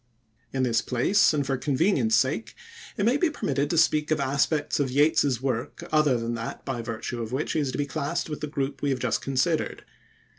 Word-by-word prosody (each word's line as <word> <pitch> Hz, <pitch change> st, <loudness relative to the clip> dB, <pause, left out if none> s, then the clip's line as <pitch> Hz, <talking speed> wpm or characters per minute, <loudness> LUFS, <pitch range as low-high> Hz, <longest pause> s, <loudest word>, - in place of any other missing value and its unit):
In 130 Hz, -1 st, -1 dB
this 115 Hz, -3 st, +2 dB
place, 155 Hz, -, +3 dB
and 145 Hz, -3 st, 0 dB
for 135 Hz, 0 st, -1 dB
convenience 135 Hz, -, +2 dB
sake, 130 Hz, -, 0 dB, 0.4 s
it 200 Hz, -, +1 dB
may 245 Hz, +5 st, +3 dB
be 345 Hz, +2 st, +2 dB
permitted 145 Hz, -, -1 dB
to 170 Hz, -, 0 dB
speak 155 Hz, -1 st, +3 dB
of 155 Hz, 0 st, +1 dB
aspects 140 Hz, +3 st, 0 dB
of 140 Hz, -2 st, +1 dB
Yeats's 140 Hz, -2 st, +2 dB
work 125 Hz, -3 st, -3 dB
other 150 Hz, -5 st, +3 dB
than 115 Hz, 0 st, -3 dB
that 115 Hz, 0 st, -6 dB
by 130 Hz, -4 st, -3 dB
virtue 115 Hz, +1 st, -5 dB
of 115 Hz, 0 st, -5 dB
which 135 Hz, +4 st, -2 dB
he -, -, 0 dB
is 140 Hz, -3 st, -1 dB
to -, -, -5 dB
be 145 Hz, -, 0 dB
classed 145 Hz, 0 st, -2 dB
with 150 Hz, -1 st, -6 dB
the 150 Hz, -, -2 dB
group 140 Hz, -2 st, -3 dB
we 145 Hz, -, 0 dB
have 135 Hz, -, +1 dB
just 120 Hz, -3 st, 0 dB
considered. 140 Hz, +5 st, -1 dB
140 Hz, 215 wpm, -26 LUFS, 125-155 Hz, 0.4 s, place